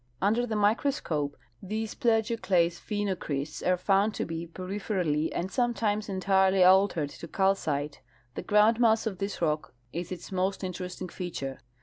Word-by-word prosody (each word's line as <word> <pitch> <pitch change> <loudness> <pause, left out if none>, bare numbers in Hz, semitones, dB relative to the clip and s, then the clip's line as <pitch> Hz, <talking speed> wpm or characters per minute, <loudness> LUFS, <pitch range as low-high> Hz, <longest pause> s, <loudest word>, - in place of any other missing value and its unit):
Under 225 +5 +2
the 220 - -2
microscope 205 - 0 0.2
these 215 +2 -3
plagioclase 220 -7 +1
phenocrysts 180 -8 -3
are 180 0 +2
found 200 +3 +2
to - - -1
l)e 165 0 -5
peripherally 185 -3 -2
and 185 +2 -3
sometimes 220 -3 0
entirely 190 0 +3
altered 185 -5 +4
to 170 - -9
calcite. 155 -7 0 0.3
The - - -4
groundmass 220 +2 +4
of 195 -5 -3
this 195 -3 -3
rock 150 -4 -1 0.2
is 175 +2 -4
its 180 0 -7
most 190 +1 -1
interesting 180 0 -5
feature. 155 -7 -5
190 Hz, 135 wpm, -28 LUFS, 170-210 Hz, 0.3 s, altered